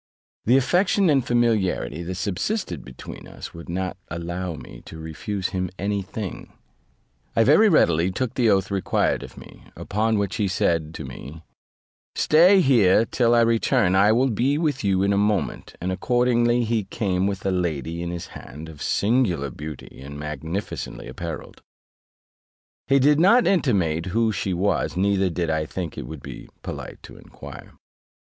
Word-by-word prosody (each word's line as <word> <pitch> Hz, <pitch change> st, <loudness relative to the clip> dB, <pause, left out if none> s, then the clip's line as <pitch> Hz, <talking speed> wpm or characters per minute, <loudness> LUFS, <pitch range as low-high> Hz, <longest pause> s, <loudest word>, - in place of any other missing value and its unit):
The 125 Hz, +4 st, +5 dB
affection 180 Hz, +6 st, +3 dB
and 135 Hz, -3 st, +3 dB
familiarity 110 Hz, -, 0 dB
that 90 Hz, +2 st, -5 dB
subsisted 95 Hz, -, -2 dB
between 65 Hz, 0 st, -10 dB
us -, -, -9 dB
would 85 Hz, 0 st, -10 dB
not 95 Hz, +2 st, -3 dB
allow 85 Hz, +1 st, -4 dB
me -, -, -11 dB
to 80 Hz, -, -10 dB
refuse 85 Hz, +5 st, -4 dB
him 90 Hz, -1 st, -2 dB
any 100 Hz, +1 st, -1 dB
thing. 95 Hz, 0 st, -7 dB, 0.8 s
I 115 Hz, -, +5 dB
very 160 Hz, -, +6 dB
readily 85 Hz, -, +3 dB
took 115 Hz, +6 st, -2 dB
the 120 Hz, -3 st, +2 dB
oath 95 Hz, -1 st, +2 dB
required 100 Hz, -2 st, 0 dB
of -, -, -11 dB
me: -, -, -14 dB
upon 110 Hz, +2 st, 0 dB
which 100 Hz, +2 st, -1 dB
he 105 Hz, -3 st, +1 dB
said 85 Hz, -4 st, 0 dB
to 75 Hz, -, -6 dB
me, 70 Hz, +5 st, -10 dB, 0.7 s
"Stay 180 Hz, +5 st, +5 dB
here 115 Hz, -, +4 dB
till 120 Hz, 0 st, +2 dB
I 120 Hz, -, +5 dB
return, 115 Hz, -3 st, +2 dB
I 100 Hz, +2 st, +5 dB
will 125 Hz, +3 st, +2 dB
be 130 Hz, +7 st, +1 dB
with 150 Hz, -6 st, -1 dB
you 95 Hz, -1 st, +2 dB
in 100 Hz, +1 st, +2 dB
a 100 Hz, -, +2 dB
moment; 105 Hz, -2 st, -1 dB
and 90 Hz, +2 st, -2 dB
accordingly 120 Hz, +3 st, +2 dB
he 110 Hz, -3 st, 0 dB
came 95 Hz, -2 st, -1 dB
with 100 Hz, -1 st, -4 dB
a 95 Hz, -, +2 dB
lady 85 Hz, -3 st, -2 dB
in 85 Hz, -, -3 dB
his 85 Hz, -1 st, -6 dB
hand, 75 Hz, +6 st, -10 dB
of 75 Hz, -3 st, -12 dB
singular 100 Hz, -, +1 dB
beauty, 75 Hz, -1 st, -9 dB
and 70 Hz, +1 st, -8 dB
magnificently 75 Hz, +6 st, -5 dB
apparelled: 85 Hz, -2 st, -7 dB, 1.3 s
he 140 Hz, -, +4 dB
did 145 Hz, +2 st, +4 dB
not 230 Hz, +8 st, +5 dB
intimate 95 Hz, -, +1 dB
who 110 Hz, +4 st, +1 dB
she 100 Hz, -2 st, -2 dB
was, 95 Hz, 0 st, 0 dB
neither 95 Hz, 0 st, +2 dB
did 85 Hz, -1 st, -2 dB
I 80 Hz, -1 st, -1 dB
think 85 Hz, -2 st, -5 dB
it -, -, -6 dB
would 75 Hz, 0 st, -9 dB
be -, -, -9 dB
polite -, -, -7 dB
to -, -, -12 dB
enquire. -, -, -12 dB
95 Hz, 165 wpm, -23 LUFS, 85-120 Hz, 1.3 s, very